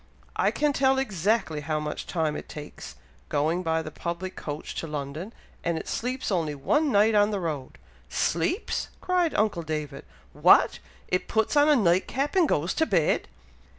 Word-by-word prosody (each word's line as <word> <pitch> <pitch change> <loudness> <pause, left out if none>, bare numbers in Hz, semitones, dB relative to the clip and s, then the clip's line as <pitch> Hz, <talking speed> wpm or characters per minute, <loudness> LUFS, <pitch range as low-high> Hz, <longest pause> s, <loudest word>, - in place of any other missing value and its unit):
"I - - +3
can 295 +6 +1
tell 270 -1 +3
exactly 200 - 0
how 155 +1 -1
much 150 0 -5
time 160 -4 -1
it - - -7
takes 150 -1 -9 0.3
going 155 +5 +1
by 160 -2 0
the 155 - -7
public 175 +4 -5
coach 150 +1 -6
to 165 - -3
London, 150 +6 -5 0.3
and 170 -1 0
it - - -6
sleeps 255 0 -2
only 160 -5 0
one 295 - +1
night 210 +1 +4
on 205 0 +4
the 205 -2 -1
road." 150 -7 -4 0.3
"Sleeps!" 365 +7 -1
cried 360 -3 +1
uncle 210 -5 +1
David. 150 -3 -4 0.3
"What! - - +5 0.3
it 180 - -1
puts 220 +5 +1
on 290 +1 +5
a 300 - +6
night 185 -6 +3
cap, 280 +5 -2
and 355 -5 +4
goes 165 +5 +1
to 320 - +1
bed?" 170 -7 +2
180 Hz, 175 wpm, -26 LUFS, 155-250 Hz, 0.3 s, a